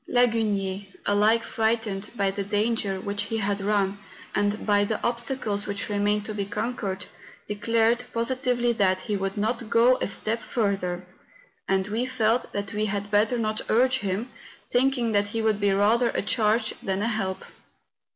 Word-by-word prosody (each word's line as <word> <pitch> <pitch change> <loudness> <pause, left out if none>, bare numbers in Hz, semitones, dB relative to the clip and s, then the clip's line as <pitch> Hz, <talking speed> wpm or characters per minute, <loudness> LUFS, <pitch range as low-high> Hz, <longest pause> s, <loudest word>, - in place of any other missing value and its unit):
Lagunier, 210 -5 +1 0.2
alike 215 +3 +3
frightened 220 -3 -1
by 200 -3 +1
the 200 +1 -3
danger 205 -1 0
which 205 +1 -2
he 225 +2 -2
had 200 -1 -1
run, 200 -1 +1 0.3
and 205 +1 0
by 205 -1 +4
the 210 +1 -1
obstacles 235 -4 -1
which 200 +1 -3
remained 205 0 +1
to 215 - -4
be 205 -1 -2
conquered, 200 -2 -3 0.4
declared 230 +3 +1
positively 245 0 +1
that 185 -4 +2
he 210 - -2
would 195 +1 -2
not 220 +2 -1
go 240 +3 +5
a - - -2
step 220 +3 -1
fur¬ 200 -5 0
ther; 180 0 -4 0.6
and 190 0 +1
we 230 +4 -1
felt 240 -1 +1
that 200 +1 -4
we 210 +1 0
had 205 0 -3
better 215 +4 +3
not 215 -1 -1
urge 255 +3 +3
him, 200 +3 -2 0.4
thinking 245 -2 +2
that 205 -1 +2
he 225 +2 -2
would 215 -2 +2
be 205 -1 +2
rather 220 +5 +3
a - - +1
charge 215 +1 +1
than 195 +1 -1
a - - +1
help. 195 -5 -2
210 Hz, 170 wpm, -26 LUFS, 200-230 Hz, 0.6 s, go